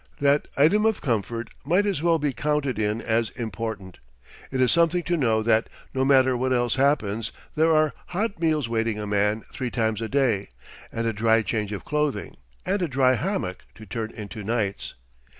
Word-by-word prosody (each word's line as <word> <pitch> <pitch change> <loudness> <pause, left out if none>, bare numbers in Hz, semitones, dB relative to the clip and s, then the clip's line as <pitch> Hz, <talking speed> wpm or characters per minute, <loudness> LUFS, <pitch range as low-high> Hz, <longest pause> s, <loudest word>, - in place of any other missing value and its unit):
That 140 +1 +3
item 165 +10 +4
of 220 - +1
comfort 115 -2 -2
might 180 +9 +2
as 195 -7 -1
well 165 0 +3
be 145 -3 -1
counted 145 -4 -1
in 105 +2 -1
as 115 0 +1
important. 110 -4 -5 0.5
It 130 - -3
is 130 -1 +4
something 170 +1 +3
to 175 - 0
know 115 -8 +2
that, 110 0 +2 0.2
no 130 - +1
matter 130 -1 +4
what 130 +1 0
else 120 -2 +2
happens, 130 -6 +1 0.2
there 160 +1 +3
are 155 -1 +3
hot 200 +1 -2
meals 155 -6 +1
waiting 115 -1 -1
a 105 - -4
man 105 +1 +1
three 125 -2 -3
times 110 -2 -1
a 110 - -3
day, 120 -8 +1 0.4
and 115 - -2
a 115 - 0
dry 110 +1 +3
change 105 -2 -2
of 100 - -5
clothing, 150 -2 -1 0.3
and 195 +1 0
a 175 - +1
dry 130 -2 +3
hammock 130 - -2
to 110 - -12
turn 110 +2 -4
into 105 -1 -8
nights. 105 -2 -2
120 Hz, 185 wpm, -25 LUFS, 110-150 Hz, 0.5 s, item